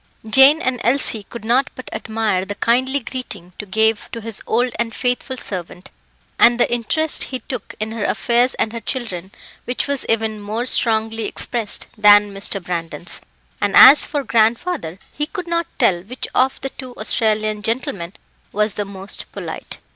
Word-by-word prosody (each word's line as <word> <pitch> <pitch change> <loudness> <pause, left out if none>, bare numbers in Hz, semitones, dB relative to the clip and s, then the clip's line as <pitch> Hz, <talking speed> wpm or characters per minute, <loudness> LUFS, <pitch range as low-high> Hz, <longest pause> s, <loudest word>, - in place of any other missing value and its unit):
Jane 270 +7 +6
and 250 -2 -1
Elsie 240 -3 +2
could 235 -2 -9
not 260 +5 +2
but 255 - -10
admire 220 -4 -1
the 205 +1 -5
kindly 260 +5 +1
greeting 215 -8 -7
to 210 - -6
gave 220 +2 +1
to 230 - -5
his 225 -2 -4
old 245 +2 +1
and 230 -1 -2
faithful 250 +1 -2
servant, 180 -4 -5 0.5
and 240 0 +6
the 240 - +3
interest 295 +7 +1
he 255 -2 -5
took 250 -2 -7
in 215 +1 -3
her 225 -2 -4
affairs 240 +4 +1
and 220 - -1
her 230 - -4
children, 210 -7 -5 0.4
which 245 - -2
was 280 -2 -1
even 220 -1 0
more 215 +4 -3
strongly 225 -2 +2
expressed 230 -1 -1
than 205 -1 +6
Mr. 195 0 -3
Brandon's; 170 0 -2 0.4
and - - 0
as 295 - +10
for 290 -2 -2
grandfather, 230 - 0 0.2
he 295 +1 -3
could 365 0 -6
not 335 -1 -1
tell 175 -2 +2
which 240 +8 -6
of 260 +1 +2
the 270 - -3
two 255 -2 -10
Australian 215 -1 0
gentlemen 205 -6 -3 0.4
was 210 0 0
the 205 - -3
most 195 0 -8
polite. - - -7
225 Hz, 170 wpm, -19 LUFS, 210-255 Hz, 0.5 s, as